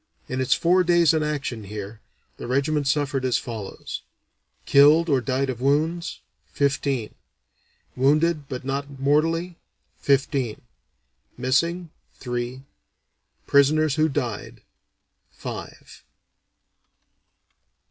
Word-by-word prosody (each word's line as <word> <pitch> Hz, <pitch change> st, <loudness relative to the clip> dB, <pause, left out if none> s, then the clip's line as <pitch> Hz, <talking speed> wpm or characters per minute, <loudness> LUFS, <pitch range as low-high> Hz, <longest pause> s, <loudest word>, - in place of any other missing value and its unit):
In 130 Hz, 0 st, -2 dB
its 130 Hz, +1 st, +3 dB
four 180 Hz, +2 st, +3 dB
days 170 Hz, -2 st, +4 dB
in 160 Hz, -, +1 dB
action 145 Hz, -7 st, -3 dB
here, 105 Hz, +2 st, -7 dB, 0.4 s
the -, -, -7 dB
regiment 140 Hz, +3 st, 0 dB
suffered 140 Hz, -2 st, 0 dB
as 130 Hz, -2 st, +2 dB
follows: 110 Hz, -5 st, -6 dB, 0.6 s
Killed 150 Hz, +4 st, +6 dB
or 135 Hz, -3 st, +3 dB
died 135 Hz, +2 st, -1 dB
of 125 Hz, -1 st, -8 dB
wounds, 160 Hz, +6 st, 0 dB, 0.3 s
fifteen; 140 Hz, -4 st, -1 dB, 0.8 s
wounded 150 Hz, +3 st, +2 dB
but 130 Hz, -1 st, -6 dB
not 140 Hz, 0 st, -4 dB
mortally, 165 Hz, +5 st, +1 dB, 0.4 s
fifteen; 135 Hz, -4 st, 0 dB, 0.8 s
missing, 165 Hz, +7 st, 0 dB, 0.2 s
three; 125 Hz, +1 st, -4 dB, 0.8 s
prisoners 150 Hz, +1 st, +4 dB
who 155 Hz, +1 st, +2 dB
died, 125 Hz, -7 st, -4 dB, 0.7 s
five. -, -, -9 dB
140 Hz, 95 wpm, -24 LUFS, 130-155 Hz, 0.8 s, Killed